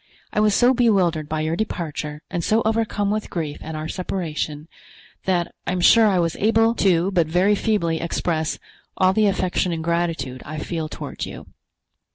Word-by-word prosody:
I - - +1
was 210 -1 +3
so 250 +1 +5
bewildered 185 - +2
by 155 0 -1
your 160 +1 -1
departure 155 -6 -4
and 170 - -2
so 220 +5 +2
overcome 220 -2 0
with 215 0 -2
grief 155 -4 -4
at 160 - -6
our 155 0 -4
separation, 160 -4 -4 0.6
that 180 -2 0
I - - 0
am 185 - -1
sure 220 +5 +6
I 195 -3 +2
was 170 -1 0
able 225 +2 +3
to 185 -1 +3
but 170 -4 +2
very 180 +5 +3
feebly 195 -6 0
express 165 -1 -1 0.4
all 185 0 +4
the 215 +1 +3
affection 185 -2 0
and 165 -1 -3
gratitude 165 -6 -1
I 155 +1 -7
feel 160 0 -4
toward - - -6
you. - - -10
175 Hz, 180 wpm, -22 LUFS, 160-205 Hz, 0.6 s, sure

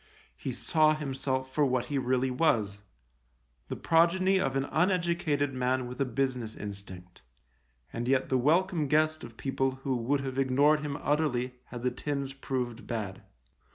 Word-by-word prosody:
He - - -4
saw 155 -1 +3
himself 130 -2 -2
for 150 - +2
what 130 -3 +1
he 140 -2 -1
really 130 0 +1
was 110 -8 +1 0.5
— - - -42
the - - -2
progeny 185 +4 +3
of 135 -8 0
an 135 0 +1
uneducated 170 -5 +1
man 130 0 0
with 125 +2 -6
a - - +3
business 125 -3 -2
instinct, 95 -3 -9 0.7
and 120 +1 -3
yet 135 0 +2
the 130 - +3
welcome 165 +3 +2
guest 155 +2 +2
of 115 - -10
people 135 -1 -1
who 135 -2 0
would 130 +4 0
have 135 -1 -3
ignored 140 +3 +4
him 145 -1 -4
utterly 135 -5 0
had 120 -1 -8
the 125 - +1
tins 140 +1 -3
proved 125 -3 -4
bad. 105 -5 -4
135 Hz, 160 wpm, -29 LUFS, 125-150 Hz, 0.7 s, ignored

